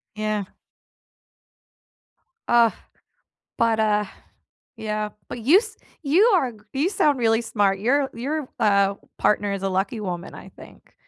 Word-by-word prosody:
Yeah. 215 Hz, -2 st, -2 dB, 2.0 s
Ugh. 235 Hz, -1 st, +4 dB, 0.9 s
But, 225 Hz, -1 st, +2 dB
uh 210 Hz, -1 st, +2 dB, 0.7 s
yeah. 215 Hz, -1 st, -3 dB, 0.2 s
But, 245 Hz, -, -6 dB
you 300 Hz, -, +6 dB
s 435 Hz, 0 st, -3 dB, 0.3 s
you 320 Hz, +9 st, +4 dB
are 265 Hz, -8 st, +1 dB
g 220 Hz, -, -17 dB, 0.2 s
you 295 Hz, +7 st, +1 dB
sound 290 Hz, -9 st, +2 dB
really 225 Hz, 0 st, +2 dB
smart, 200 Hz, -4 st, 0 dB
your 270 Hz, +5 st, +1 dB
your, 280 Hz, +4 st, -4 dB
uh, 200 Hz, -1 st, +3 dB, 0.2 s
partner 205 Hz, -1 st, +1 dB
is 195 Hz, 0 st, -5 dB
a 195 Hz, -, 0 dB
lucky 195 Hz, +4 st, -1 dB
woman, 180 Hz, -2 st, -5 dB
I -, -, -11 dB
think. -, -, -17 dB
220 Hz, 135 wpm, -23 LUFS, 205-265 Hz, 2.0 s, you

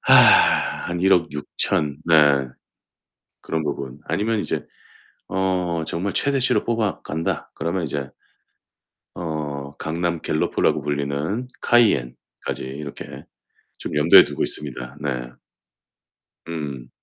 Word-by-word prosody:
아. -, -, +7 dB, 0.2 s
한 85 Hz, -, -2 dB
160,000,000 75 Hz, -5 st, +1 dB
네. 75 Hz, -5 st, +5 dB, 0.9 s
그런 80 Hz, -1 st, -2 dB
부분. 70 Hz, -2 st, -4 dB
아니면 110 Hz, +2 st, 0 dB
이제 -, -, -3 dB, 0.6 s
어 90 Hz, -3 st, 0 dB
정말 95 Hz, +4 st, -2 dB
최대치로 135 Hz, -2 st, +1 dB
뽑아간다. 105 Hz, -8 st, -2 dB
그러면 85 Hz, +2 st, -2 dB
이제 70 Hz, -2 st, -4 dB, 1.1 s
어 75 Hz, -4 st, -5 dB
강남 85 Hz, +1 st, -2 dB
갤로포라고 75 Hz, -, +1 dB
불리는 75 Hz, -, -2 dB
카이엔까지 105 Hz, -, +1 dB
이렇게 70 Hz, +2 st, -8 dB, 0.5 s
좀 -, -, -6 dB
염두에 75 Hz, +3 st, +8 dB
두고 -, -, -4 dB
있습니다. 65 Hz, -4 st, -5 dB
네. 60 Hz, -4 st, -3 dB, 1.2 s
음. 70 Hz, -7 st, -5 dB
80 Hz, 210 characters per minute, -22 LUFS, 70-90 Hz, 1.2 s, 염두에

